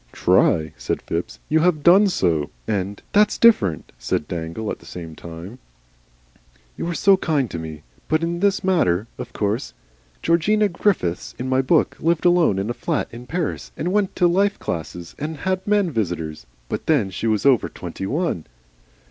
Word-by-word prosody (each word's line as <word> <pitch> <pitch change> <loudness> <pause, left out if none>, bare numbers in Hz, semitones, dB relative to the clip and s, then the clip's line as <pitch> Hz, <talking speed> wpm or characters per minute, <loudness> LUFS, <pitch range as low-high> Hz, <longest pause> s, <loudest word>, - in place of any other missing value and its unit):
"TRY!" 80 -1 +3
said - - -3
Phipps. - - -4
"You 160 - +3
HAVE 160 -3 +2
done 195 +4 +7
so." 85 - +1 0.2
And, 100 -1 -2
"That's 210 +1 +4
different," 105 - +3
said - - -2
Dangle, 85 +5 -4
at - - -6
the - - -18
same 80 -3 -8
time. 85 +10 -9 1.2
"You - - -4
are 170 - -2
so 195 +1 +5
kind 145 - 0
to 85 - -4
me. 80 -2 -8 0.2
But 155 +1 +1
in 170 +1 -1
this 200 +1 +1
matter. 110 - +2
Of 125 -1 -6
course 105 - -2 0.5
Georgina 205 +6 +3
Griffiths 170 - -1
in 130 - -4
my 130 0 +2
book 155 +5 +2
lived 170 +1 +1
alone 175 - +4
in 100 +4 -1
a - - -2
flat - - -2
in 120 +1 -10
Paris 170 0 -3
and 175 +4 -2
went 205 -2 +1
to 180 - +3
life 195 +4 +2
classes 85 +1 -5
and 155 +1 -4
had 185 +5 -2
men 205 -4 +2
visitors, 85 - -3 0.2
but - - -4
then 130 -12 +2
she 105 +5 -3
was 110 +1 +1
over 135 -4 +4
twenty 95 - -6
one." 145 - -2
130 Hz, 175 wpm, -22 LUFS, -, 1.2 s, done